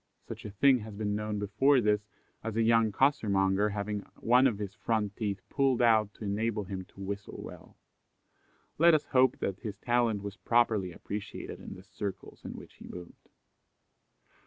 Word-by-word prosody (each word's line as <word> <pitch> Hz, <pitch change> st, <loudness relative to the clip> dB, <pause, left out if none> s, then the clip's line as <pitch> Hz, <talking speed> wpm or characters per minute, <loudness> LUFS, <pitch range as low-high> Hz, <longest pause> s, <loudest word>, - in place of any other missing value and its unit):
Such -, -, -8 dB
a -, -, -4 dB
thing 130 Hz, +6 st, +4 dB
has 110 Hz, -1 st, -8 dB
been 105 Hz, 0 st, -2 dB
known 105 Hz, 0 st, -2 dB
before 135 Hz, +7 st, +3 dB
this, 105 Hz, -2 st, +1 dB, 0.4 s
as 110 Hz, -1 st, -4 dB
a 115 Hz, -, +2 dB
young 115 Hz, -1 st, +4 dB
costermonger 100 Hz, -5 st, +2 dB
having 105 Hz, 0 st, -3 dB, 0.2 s
one 125 Hz, +3 st, +4 dB
of 115 Hz, -6 st, -1 dB
his 100 Hz, -2 st, -5 dB
front 110 Hz, -2 st, -1 dB
teeth 100 Hz, -4 st, -3 dB
pulled 135 Hz, -3 st, +1 dB
out 110 Hz, -3 st, +4 dB
to -, -, -10 dB
enable 105 Hz, +1 st, -1 dB
him 95 Hz, -1 st, -6 dB
to 95 Hz, -, -20 dB
whistle 100 Hz, +1 st, -5 dB
well. -, -, -11 dB, 1.0 s
Let 170 Hz, 0 st, +7 dB
us 155 Hz, -, 0 dB
hope 130 Hz, -1 st, +3 dB
that 100 Hz, 0 st, -3 dB
his 105 Hz, -4 st, -6 dB
talent 115 Hz, -3 st, +1 dB
was 100 Hz, -1 st, -6 dB
properly 110 Hz, -2 st, +2 dB
appreciated 100 Hz, +4 st, -6 dB
in -, -, -9 dB
the -, -, -12 dB
circles 100 Hz, -2 st, -7 dB
in -, -, -6 dB
which -, -, -11 dB
he -, -, -11 dB
moved. 90 Hz, -1 st, -11 dB
105 Hz, 175 wpm, -30 LUFS, 100-115 Hz, 1.0 s, Let